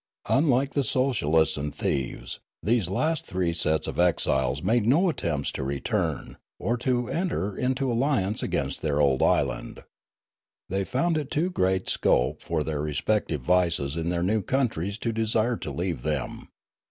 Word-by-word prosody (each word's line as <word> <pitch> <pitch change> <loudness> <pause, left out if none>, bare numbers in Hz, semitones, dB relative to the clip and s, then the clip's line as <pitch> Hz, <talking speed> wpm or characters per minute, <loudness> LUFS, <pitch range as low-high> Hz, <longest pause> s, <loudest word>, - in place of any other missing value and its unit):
Unlike 135 -1 +3
the 140 - +1
socialists 110 - +2
and 75 0 -4
thieves, 65 -3 -2 0.2
these 110 -3 +2
4IO - - -8
Riallaro 95 - -3
last 160 0 0
three 90 -3 0
sets 80 -2 0
of - - -4
exiles 70 -6 +1
made 115 -1 +2
no 170 +9 +4
attempts 80 - -1
to - - -4
return, 70 +1 -2 0.2
or 115 +6 0
to 125 -1 0
enter 165 - -1
into 130 0 0
alliance 115 -5 +1
against - - -2
their 75 -2 0
old 70 -3 +3
island. 65 -3 0 0.9
They 95 +1 -1
found 155 - 0
too 170 +5 0
great 95 - +1
scope 60 +1 +1
for 80 -3 -1
their 75 -1 -2
respective 75 +1 -1
vices 85 -2 +1
in 85 0 -2
their 85 -1 0
new 105 +4 +1
countries 100 -5 -1
to 115 0 -2
desire 110 +1 +1
to - - -6
leave 85 -1 -2
them. - - -3
95 Hz, 160 wpm, -26 LUFS, 80-125 Hz, 0.9 s, no